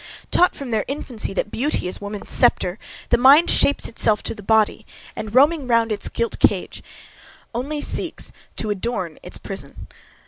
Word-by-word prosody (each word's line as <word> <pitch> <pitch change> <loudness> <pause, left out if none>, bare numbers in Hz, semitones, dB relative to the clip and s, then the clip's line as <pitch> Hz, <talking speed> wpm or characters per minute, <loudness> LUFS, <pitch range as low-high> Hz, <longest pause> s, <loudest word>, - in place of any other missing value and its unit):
Taught 360 - +4
from 270 -4 -7
their 220 -2 +1
infancy, 255 -5 -4
that 205 +1 -2
beauty 270 -6 0
is 180 - -3
woman's 205 0 -6
sceptre, 180 +3 +2 0.3
the 240 - +3
mind 280 +6 +7
shapes 285 - +3
itself 215 -2 +1
to - - -2
the 215 - -11
body, 220 +1 +2 0.3
and, 215 +1 -6
roaming 290 +1 +4
round 230 -2 +2
its 205 - -3
gilt 230 0 -2
cage, - - +1 0.7
only 285 +5 -3
seeks - - -3 0.2
to 215 - -2
adorn 190 -5 -3
its - - -5
prison. - - -8
230 Hz, 165 wpm, -21 LUFS, 210-270 Hz, 0.7 s, mind